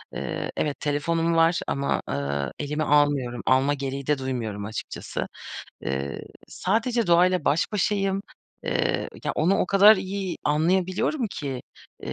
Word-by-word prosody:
Iıı, - - -3
evet, 150 -2 -1
telefonum 165 +3 0
var 165 +1 +4
ama, 140 0 0
ııı, 70 0 -2
elime 150 +1 -2
almıyorum. 145 -5 +2
Alma 135 +2 +3
gereği 135 -1 -4
de 150 -1 +2
duymuyorum 115 -6 -3
açıkçası. 110 0 -5 0.6
Iıı, 70 +1 -3 0.3
sadece 230 +4 0
doğayla 175 -1 +4
baş 175 +8 +1
başayım. 195 -1 0 0.4
Iıı, - - 0 0.2
ya, - - 0
onu 180 +5 +2
o - - +1
kadar 200 +3 +7
iyi 190 -1 -3
anlayabiliyorum 185 - +1
ki, 135 -7 -5 0.4
ııı, - - -4
155 Hz, 135 wpm, -25 LUFS, 135-185 Hz, 0.6 s, kadar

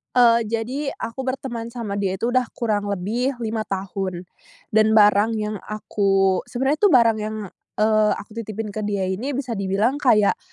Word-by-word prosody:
Eee, 235 -2 +5
jadi, 250 +6 -3
aku 240 +3 -6
berteman 240 -3 -4
sama 210 -4 -4
dia 190 -2 -1
itu 230 +5 -1
udah 255 -1 +2
kurang 210 -3 -1
lebih 220 +8 -1
5 220 -1 -2
tahun. 190 -2 -4 0.5
Dan 220 0 +4
barang 210 +1 +5
yang 210 -1 -3
aku 195 -3 +1
sebenernya 270 +4 0
itu 415 - +4
barang 235 - +5
yang, 215 +1 -4 0.4
eee, 215 0 +3
aku 205 - -10
titipin 215 -1 -5
ke 210 0 -4
dia 195 -2 -1
ini 250 +9 -3
bisa 245 -6 -3
dibilang 200 +8 0
kayak, 215 -7 +3
215 Hz, 165 wpm, -22 LUFS, 205-240 Hz, 0.5 s, Eee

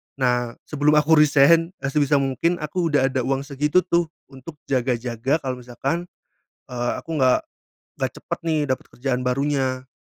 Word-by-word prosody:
Nah, 125 -3 0
sebelum 150 0 +1
aku 150 +1 +5
resign, 155 +4 +4
eee, 140 - -1
sebisa 145 -1 +2
mungkin 140 +5 +1
aku 165 +2 -2
udah 135 -3 +2
ada 130 - -1
uang 135 0 0
segitu, 150 +5 +1
tuh, 170 -1 +1 0.2
untuk 135 +4 -11
jaga-jaga 125 +2 -1
kalau 130 -1 -3
misalkan, 135 +8 -3 0.6
eee, 120 -1 -2
aku 165 -2 -5
nggak 130 -2 +3 0.5
nggak - - -2
cepat, - - -5
nih, 160 -2 +1
dapat 130 - -2
kerjaan 125 0 -2
barunya. 130 0 -1
140 Hz, 155 wpm, -22 LUFS, 130-150 Hz, 0.6 s, aku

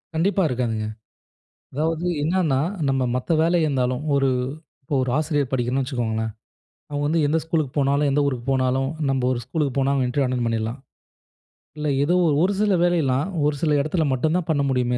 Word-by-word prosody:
கண்டிப்பா 195 +4 +2
இருக்காதுங்க. 115 -5 -2 0.9
அதாவது 160 +4 -1 0.2
என்னன்னா, 160 -4 +1 0.3
நம்ம 135 -1 +1
மத்த 130 +6 -2
வேலை 170 +2 +3
இருந்தாலும், 130 -3 0
ஒரு 135 -1 +3 0.5
இப்போ 145 +2 -4
ஒரு 130 - -1
ஆசிரியர் 145 -4 0
படிக்கணும்னு 130 +1 0
வச்சுக்கோங்களேன். 110 -4 -2 0.6
அவங்க 145 0 -2
வந்து 160 +2 +2
எந்த 155 +3 +2
ஸ்கூலுக்கு 160 -5 -1
போனாலும், 140 +1 +2
எந்த 145 - +2
ஊருக்கு 130 -4 -2
போனாலும், 130 0 +1 0.2
நம்ப 135 -1 0
ஒரு 120 - -2
ஸ்கூலுக்கு 140 0 -2
போனா, 135 +1 +2
அவுங்க 135 -2 +1
இன்டர்வியூ 135 +2 +1
அட்டெண்ட் 125 -2 -1
பண்ணிடலாம். 115 +3 -2 1.0
இல்ல 150 0 -1
ஏதோ 175 +5 +2 0.3
ஒரு 195 - +2
சில 210 -2 +3
வேலையெல்லாம் 155 -5 +1 0.2
ஒரு 150 - 0
சில 155 -2 +2
இடத்துல 155 +2 0
மட்டும் 155 +6 0
தான் 175 -2 -4
பண்ண 150 -3 +2
முடியுமே 125 -2 +1
140 Hz, 170 wpm, -23 LUFS, 125-155 Hz, 1.0 s, வேலை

